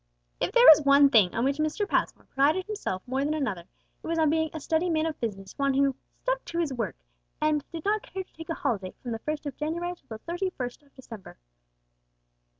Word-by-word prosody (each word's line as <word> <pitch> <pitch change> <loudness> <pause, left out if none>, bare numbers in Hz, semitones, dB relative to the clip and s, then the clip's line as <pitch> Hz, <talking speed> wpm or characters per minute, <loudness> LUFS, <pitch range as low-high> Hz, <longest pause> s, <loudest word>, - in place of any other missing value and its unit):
If - - 0
there - - +6
was 315 -6 +10
one 280 0 +6
thing 205 -8 +4
on 235 - +1
which 280 +2 0
Mr. 310 +7 0
Passmore - - -1
prided 305 +7 +2
himself 410 - -4
more 265 +2 -1
than 300 +2 0
another, 210 - -2 0.4
it - - -7
was 330 0 -1
on 315 -2 +3
being 320 0 +1
a 315 - -6
steady 320 +4 0
man 315 -1 +1
of 320 -2 -3
business, 195 -4 -5
one 275 -1 +2
"who 275 -1 +2 0.3
stuck - - 0
to 335 - -5
his 325 -5 0
work, 230 -6 -3 0.4
and 305 -1 +1
did 330 -2 -7
not 425 +1 +2
care 380 0 -6
to - - -36
take 325 +1 -10
a 330 - -1
holiday 195 -5 -2
from 245 - -4
the 225 - -3
first 305 +4 -4
of 285 -3 -5
January 340 +4 -2
till - - -33
the 220 - -7
thirty 350 - -3
first 250 -7 -6
of 285 -1 -27
December." 225 -7 -11
300 Hz, 230 wpm, -27 LUFS, 255-330 Hz, 0.4 s, was